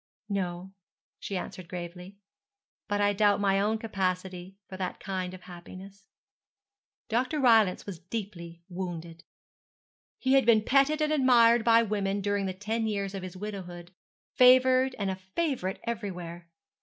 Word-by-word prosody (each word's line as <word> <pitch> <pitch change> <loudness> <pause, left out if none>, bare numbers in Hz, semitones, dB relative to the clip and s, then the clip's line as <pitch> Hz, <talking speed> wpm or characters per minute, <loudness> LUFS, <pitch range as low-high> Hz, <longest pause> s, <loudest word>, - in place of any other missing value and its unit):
'No,' 185 -1 -3 0.5
she 195 - -4
answered 180 -1 -7
gravely, 180 +2 -8 0.7
'but 205 0 -1
I 205 0 +3
doubt 205 0 +3
my 195 -1 +2
own 215 +2 +1
capacity 190 -3 -3
for 190 - -9
that 185 -1 -4
kind 185 -2 -4
of 185 - -13
happiness.' 185 +3 -12 1.0
Dr. 255 +6 0
Rylance 225 -8 +4
was 190 -5 -7
deeply 175 -4 -7
wounded. 170 -3 -6 0.9
He 260 0 +1
had 270 -1 +5
been 220 -2 +5
petted 275 +5 +3
and 305 0 +1
admired 240 -4 +5
by 230 0 +5
women 200 -2 -1
during 200 0 -1
the 185 - -3
ten 220 +3 -2
years 200 -2 -2
of 195 - -5
his 185 0 -8
widowhood, 180 -4 -7 0.4
favoured 255 +1 +5
and 195 -2 -1
a - - -3 0.2
favourite 265 - -1
everywhere. 180 -7 -6
200 Hz, 145 wpm, -28 LUFS, 185-225 Hz, 1.0 s, had